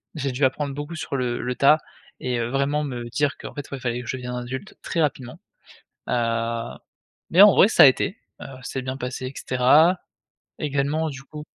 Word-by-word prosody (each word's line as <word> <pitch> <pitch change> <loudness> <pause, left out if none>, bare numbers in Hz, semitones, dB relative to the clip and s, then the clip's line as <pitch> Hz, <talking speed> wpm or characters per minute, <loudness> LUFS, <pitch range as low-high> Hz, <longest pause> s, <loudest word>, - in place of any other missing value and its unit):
j'ai 135 0 -2
dû 130 +3 +1
apprendre 140 +1 -1
beaucoup 145 +3 -6
sur 145 -3 -4
le 125 -2 -1
le 125 0 -3
tas 150 +4 +5 0.4
et 125 -1 -2
heu, 115 0 -2
vraiment 140 +3 0
me 120 -4 -5
dire 140 +3 0
qu'en - - -9
fait, 145 -2 -7
ouais, 140 - -5
fallait 120 -1 -2
que 120 - -11
je 130 - -3
devienne 125 -1 -5
adulte 130 - -6
très 170 - -1
rapidement. 145 0 -2 0.7
Heu, 115 -1 -1 0.5
mais 180 - +6
en 205 - +8
vrai - - +7
ça 225 - +6
a - - +11
été, 140 +9 +3 0.2
heu, - - -7
ça 130 -1 -10
s'est 130 +1 -4
bien 130 +1 -5
passé 130 0 -5
et 130 - -8
cetera. 145 +8 +4 0.6
Également 150 +2 0
du 135 -2 -9
coup 150 +2 -10
135 Hz, 205 wpm, -23 LUFS, 125-150 Hz, 0.7 s, a